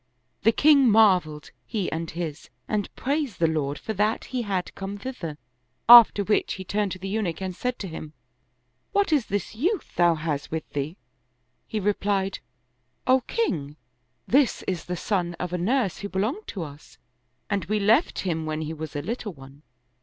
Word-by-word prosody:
The 225 - +5
king 280 0 +5
marveled, 185 -9 +3 0.2
he 210 -6 -2
and 165 0 -3
his, 160 -3 -5 0.2
and 210 -2 -1
praised 280 -5 -1
the 165 - +2
Lord 150 -3 0
for 220 - -4
that 215 +2 0
he 250 - 0
had 195 -5 -2
come 195 +1 -6
thither; 200 - -6 0.5
after 235 -3 +9
which 210 +2 +1
he 190 - -7
turned 205 +1 -1
to - - -7
the 190 +1 -6
Eunuch 195 -5 -2
and 190 -2 -4
said 250 +4 -2
to 195 - -5
him, 155 -2 -8 0.4
" - - -47
What 400 -5 +2
is 280 -7 +2
this 200 -2 -2
youth 350 - -1
thou 175 -1 +4
hast 155 -2 -3
with 160 -1 -4
thee? 145 +6 -3 0.4
" 125 +1 -47
He 220 - -2
replied, 195 -1 0 0.3
" 125 0 -47
O 260 - +4
king, 150 - -1 0.5
this 270 0 +3
is 180 -4 -3
the 180 0 -3
son 175 -2 -1
of 180 +1 -5
a 180 - -1
nurse 210 0 0
who 200 +1 -5
belonged 215 - -2
to 185 - -4
us 145 -1 -12 0.5
and 200 -5 -1
we 210 +4 0
left 225 - +3
him 160 -4 -2
when 155 0 -2
he 155 +1 -4
was 155 -2 -7
a 145 - -2
little 220 +1 -4
one. 135 0 -14
190 Hz, 190 wpm, -25 LUFS, 160-220 Hz, 0.5 s, after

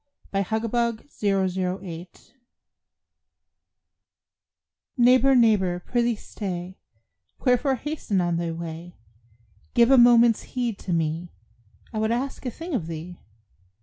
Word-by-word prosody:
AT 195 -1 -1
THE 220 +1 -1
CLOSE 235 +2 -3
OF 195 -2 +2
THE 185 0 -2
YEAR 170 0 -7 2.9
Neighbor, 255 +2 +5
neighbor, 205 -7 +3
prithee 240 -1 +1
stay; 185 -3 -6 0.7
Wherefore 260 +2 +3
hasten 260 -7 -2
on 175 -1 0
thy 170 0 -2
way? 165 +1 -7 0.8
Give 235 +2 +5
a 265 - +7
moment's 235 -1 +6 0.2
heed 235 -5 -1
to 185 - -6
me, 165 +1 -1 0.6
I 215 - -2
would 220 +1 0
ask 260 +2 -3
a - - 0
thing 330 +8 -7
of 180 -11 -1
thee. 165 +2 -7
215 Hz, 120 wpm, -25 LUFS, 175-240 Hz, 2.9 s, a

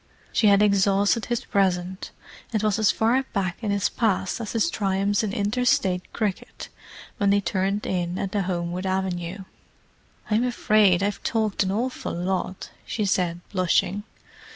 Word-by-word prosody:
She 215 - +3
had 200 0 +6
exhausted 200 +2 +3
his 240 -1 -2
present, 185 -1 0 0.4
and 215 -2 -1
was 215 0 +1
as 215 -1 +4
far 230 +5 +2
back 185 -3 -1
in 215 - -1
his 200 -1 +1
past 215 -1 -1
as 215 - -5
his 235 +9 +1
triumphs 200 0 0
in 215 -3 -2
inter 210 +3 -1
State 185 -6 +1
cricket, 210 -4 -4 0.5
when 200 - +2
they 200 +1 +4
turned 195 +1 -1
in 175 -1 -2
at 195 - -3
the 205 - 0
Homewood 180 0 -2
avenue. 185 0 -2 0.9
"I'm 220 +3 +3
afraid 210 -6 +3
I've 205 0 -1
talked 220 -3 0
an 190 -1 +1
awful 245 +6 -2
lot," 185 +1 -3
she 215 - -2
said, 175 -3 0
blushing. 185 +1 +1
200 Hz, 155 wpm, -24 LUFS, 185-215 Hz, 0.9 s, had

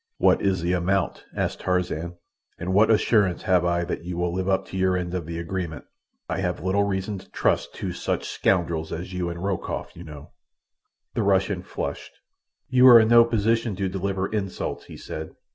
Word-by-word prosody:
"What - - +4
is 95 -3 0
the 90 +1 +1
amount?" 90 +1 0
asked - - -2
Tarzan. 90 -2 -1 0.4
"And 90 +2 -3
what 105 +3 +5
assurance 105 -4 +3
have 90 -2 +3
I 85 0 +1
that 85 0 -4
you 90 0 -5
will 90 -1 -1
live 95 +1 -1
up 95 0 +1
to - - -8
your 95 -1 +2
end 90 -1 -4
of 90 -4 -3
the 85 0 -5
agreement? 85 -3 -4 0.4
I 90 +2 -2
have 90 -2 -2
little 95 +2 +2
reason 95 0 -2
to - - -17
trust - - 0
two - - -4
such - - -2
scoundrels 85 -3 0
as 90 +3 -5
you 90 -1 -2
and 85 +1 -6
Rokoff, 95 -3 -3
you 85 - -9
know." 75 -3 -11 0.8
The - - 0
Russian 95 -1 +1
flushed. - - -5 0.5
"You 130 0 +6
are 120 -2 +10
in 110 0 +3
no 120 0 +8
position 115 -1 0
to 95 0 -1
deliver 95 0 -2
insults," 100 -3 -4
he - - -11
said. 80 0 -7
95 Hz, 195 wpm, -24 LUFS, 85-100 Hz, 0.8 s, are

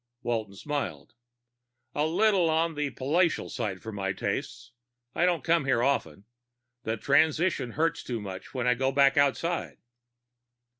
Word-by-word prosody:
Walton 110 -4 -2
smiled. 145 +4 -4 0.8
"A 150 +1 +1
little 185 0 +3
on 165 +1 +1
the 150 -1 -2
palatial 155 +6 0
side 105 -7 -4
for 110 - -6
my 95 -2 -2
tastes. 120 +4 -4 0.4
I 175 - +2
don't 170 -6 0
come 165 -3 +2
here 125 -3 +2
often. 100 - -1 0.6
The 110 0 -2
transition 155 - +2
hurts 165 +1 0
too 120 -3 -4
much 95 -2 -8
when 125 -2 -3
I 125 - +4
go 130 +2 0
back 140 0 +4
outside." 145 +5 0
140 Hz, 145 wpm, -28 LUFS, 115-160 Hz, 0.8 s, I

